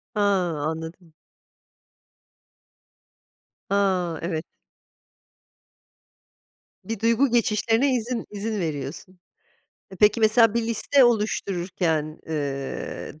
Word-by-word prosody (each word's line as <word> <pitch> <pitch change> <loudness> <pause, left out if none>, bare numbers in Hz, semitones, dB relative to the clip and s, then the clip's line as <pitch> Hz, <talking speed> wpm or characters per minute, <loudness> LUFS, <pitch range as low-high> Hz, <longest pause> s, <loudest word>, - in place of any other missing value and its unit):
Ha, 210 - +1 0.4
anladım. 160 +2 -5 2.6
Ha, 185 -4 +1
evet. 165 -1 -3 2.4
Bir 225 -2 -4
duygu 230 +5 +3
geçişlerine 235 +2 +2
izin 240 0 -3
izin 210 +1 -3
veriyorsun. 160 +3 -5 0.7
E, 190 - -10
peki 210 +4 +4
mesela 220 0 +5
bir 235 - +1
liste 250 +4 +3
oluştururken, 180 -8 0
ııı, 140 0 -4
195 Hz, 75 wpm, -24 LUFS, 160-225 Hz, 2.6 s, mesela